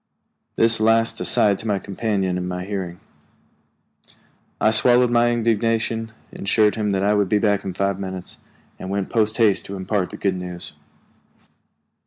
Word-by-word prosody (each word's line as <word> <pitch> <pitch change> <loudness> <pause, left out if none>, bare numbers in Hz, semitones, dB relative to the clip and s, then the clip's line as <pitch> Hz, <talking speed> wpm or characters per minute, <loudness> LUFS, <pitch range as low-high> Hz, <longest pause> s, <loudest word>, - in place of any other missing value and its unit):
This 115 -1 +2
last 115 +1 +2
aside 100 -2 +2
to 110 - -3
a 100 - 0
companion, 100 -2 -2
in 90 0 -3
my 90 0 -4
hearing. 95 -3 -5 1.6
I 110 - +3
swallowed 120 +2 +4
my 120 0 +3
indignation, 115 -1 0 0.2
assured 105 +1 +2
him 105 -2 -2
that 95 0 0
I 105 +1 +3
would 100 -2 +1
be 105 - +3
back 105 -1 +1
in 95 -2 -5
five 100 0 -1
minutes, 95 -2 -7 0.4
and 95 - -7
went 100 -1 -3
post 110 -1 +1
haste 110 -5 +3
to 100 - -7
impart 95 0 -2
the - - -9
good 95 -2 -1
news. 90 -1 -8
105 Hz, 160 wpm, -21 LUFS, 95-115 Hz, 1.6 s, swallowed